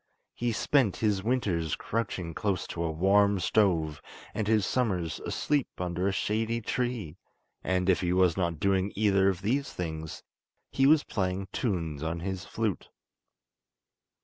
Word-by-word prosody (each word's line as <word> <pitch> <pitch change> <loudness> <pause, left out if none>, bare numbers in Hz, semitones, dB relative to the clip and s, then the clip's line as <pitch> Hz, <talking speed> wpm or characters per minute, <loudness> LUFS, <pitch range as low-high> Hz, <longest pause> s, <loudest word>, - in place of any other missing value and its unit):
He 120 0 -1
spent 120 -2 +2
his 105 -3 +1
winters 95 - 0
crouching 100 -7 -3
close 100 -1 -1
to 85 - -3
a 85 - 0
warm 100 +5 +3
stove, 85 -6 +1 0.3
and 110 - -2
his 110 -2 +3
summers 95 -11 -1
asleep 145 -3 0
under 90 +1 -1
a - - +2
shady 110 +4 0
tree; 115 -8 -3 0.5
and 90 0 0
if 95 - +3
he 90 -1 0
was 90 -2 +3
not 85 -4 -1
doing 95 +1 +1
either 100 -2 +3
of 95 -1 -3
these 135 +7 0
things 80 -3 -5 0.5
he 135 - +3
was 150 0 +6
playing 95 -1 -2
tunes 85 - -2
on 80 +1 -3
his 95 0 -4
flute. 110 -4 -2
95 Hz, 145 wpm, -29 LUFS, 85-110 Hz, 0.5 s, was